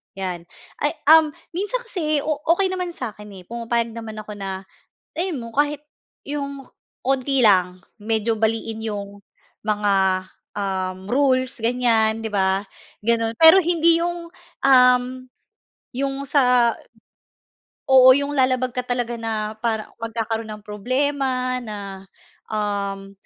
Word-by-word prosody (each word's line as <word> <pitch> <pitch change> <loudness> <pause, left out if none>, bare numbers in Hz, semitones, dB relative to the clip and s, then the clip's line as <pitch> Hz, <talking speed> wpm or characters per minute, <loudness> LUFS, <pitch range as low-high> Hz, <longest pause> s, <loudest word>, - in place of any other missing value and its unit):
'yan. 185 -3 -4 0.4
Ay 295 +2 0 0.2
uhm, 320 -1 +7 0.2
minsan 415 +7 -2
kasi 310 -7 -1
o 305 -2 -1 0.2
okey 380 0 0
naman 365 -1 -3
sa'kin, 210 -4 -7
eh, - - -13
pumapayag 235 0 -2
naman 225 -2 -7
ako 215 - -10
na 195 -1 -5 0.5
alam 350 0 -2
mo 230 -1 -8
kahit 295 +1 0 0.4
'yong 280 -1 -5 0.4
kaunti 270 +1 +1
lang. 185 -4 +4 0.2
Medyo 225 +1 0
baliin 225 0 -1
'yong 205 -2 -5 0.4
mga, 210 -1 +1 0.7
uhm, 190 -1 -3
rules, 260 -1 +2
ganyan, 225 -2 +2
'di - - -2
ba, 190 -1 +1 0.4
gano'n. 230 0 +1
Pero 325 +3 +9
hindi 335 0 +3
'yong, 345 0 -3 0.4
uhm, 250 -2 +6 0.9
'yong 275 0 -1
sa 250 -4 +4 1.2
oo, 260 -1 +8
yung 285 0 -2
lalabag 255 -2 +1
ka 250 - 0
talaga 245 -1 -2
na 220 -1 -3
para 220 -2 -1 0.2
magkakaroon 225 0 -3
ng 210 -1 -11
problema 255 +3 -1
na, 200 -3 -7 0.5
uhm, 200 -2 -3
235 Hz, 125 wpm, -22 LUFS, 210-275 Hz, 1.2 s, Pero